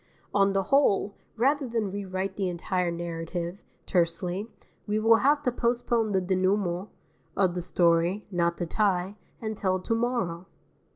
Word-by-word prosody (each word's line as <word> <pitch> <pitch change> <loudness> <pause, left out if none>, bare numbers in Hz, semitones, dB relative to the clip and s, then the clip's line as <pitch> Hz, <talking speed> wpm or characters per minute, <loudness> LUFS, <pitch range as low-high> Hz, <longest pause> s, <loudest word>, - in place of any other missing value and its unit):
On 195 -1 +3
the 195 0 +1
whole, 205 -6 +3 0.2
rather 275 +4 +2
than 225 -4 -1
rewrite 190 -1 -3
the 195 -2 -1
entire 180 +1 -1
narrative, 170 +1 -4 0.3
tersely, 180 +4 0 0.4
we 210 +1 0
will 225 +1 +5
have 290 +4 +3
to 250 - +1
postpone 235 -2 0
the 190 -1 +2
dénouement 185 0 0 0.5
(of 185 -3 +3
the 180 - -3
story, 170 +3 +2
not 170 -1 +1
the 175 - -2
tie) 190 +1 0 0.3
until 205 -4 -1
to 185 - -2
morrow. 225 -8 -1
195 Hz, 140 wpm, -27 LUFS, 175-220 Hz, 0.5 s, will